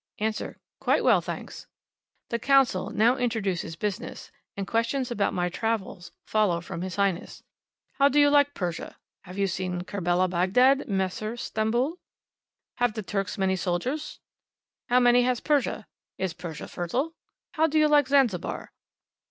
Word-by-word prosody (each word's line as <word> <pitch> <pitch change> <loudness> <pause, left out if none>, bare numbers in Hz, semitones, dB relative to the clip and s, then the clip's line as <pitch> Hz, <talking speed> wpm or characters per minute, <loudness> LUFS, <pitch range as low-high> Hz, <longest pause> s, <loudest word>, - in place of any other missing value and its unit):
Answer. 215 0 -3 0.2
"Quite - - +2
well, - - +5
thanks!" - - -7 0.6
The 235 - -1
Consul 270 -7 +3
now 235 +4 +3
introduces 205 -9 -1
business; 200 +3 -5 0.3
and 200 - -2
questions 235 +4 -1
about 205 -4 +1
my 180 0 0
travels 190 -3 -3
follow 210 -6 +2
from 170 0 -7
His 185 0 -4
Highness 195 -3 -1 0.6
"How 280 +1 +6
do 295 - +3
you 290 0 +6
like 285 0 +4
Persia?" 175 -3 -4 0.3
"Have 185 +1 -10
you 200 - +2
seen 185 -1 -3
Kerbela, 185 -1 0
Bagdad, 230 +11 +3
Masr, 195 +3 -2
Stamboul?" 240 +10 -1 0.8
"Have 245 -3 +1
the 215 - -4
Turks 195 -1 -3
many 190 -1 +1
soldiers?" 190 - -3 0.7
"How 250 +1 +5
many 245 0 +5
has 250 -1 +1
Persia?" 280 -7 0 0.3
"Is 190 -3 -2
Persia 165 -4 -7
fertile?" 255 - -2 0.4
"How 320 0 +2
do 310 0 0
you 305 0 +5
like 295 -2 +4
Zanzibar?" 255 -11 +1
215 Hz, 145 wpm, -26 LUFS, 185-255 Hz, 0.8 s, How